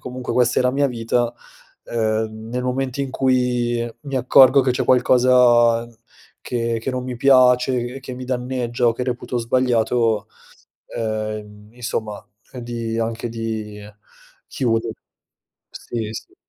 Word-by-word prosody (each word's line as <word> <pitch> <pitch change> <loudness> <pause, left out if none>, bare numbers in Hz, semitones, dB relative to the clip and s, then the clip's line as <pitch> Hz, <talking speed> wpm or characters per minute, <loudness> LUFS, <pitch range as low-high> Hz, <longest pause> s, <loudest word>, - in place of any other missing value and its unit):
comunque 125 0 -5
questa 125 0 +2
è - - +2
la 125 - +2
mia 140 +1 +2
vita, 120 0 -1 0.5
ehm, 110 -1 -2
nel 125 +1 -2
momento 130 +1 -2
in 135 -2 -3
cui 125 -2 +1 0.2
mi 140 -2 -4
accorgo 130 +2 +6
che 130 - +1
c'è - - -1
qualcosa 120 -2 +4 0.5
che 115 -1 -2
che 125 - -3
non 130 -1 -3
mi 125 -1 -5
piace, 125 -1 +4
che 130 +2 -8
che 130 -1 -8
mi 125 0 -7
danneggia 125 -1 -2
o - - +2
che 120 - -5
reputo 125 0 -3
sbagliato, 115 -2 +1 0.6
ehm, 110 -1 -5
insomma 110 -3 -4 0.4
di, 115 -1 -4
anche 115 +1 -2
di 110 -2 -5 0.7
chiudere 115 -2 -1 0.8
Sì, 115 -3 -5
sì. - - -9
120 Hz, 135 wpm, -21 LUFS, 115-125 Hz, 0.8 s, accorgo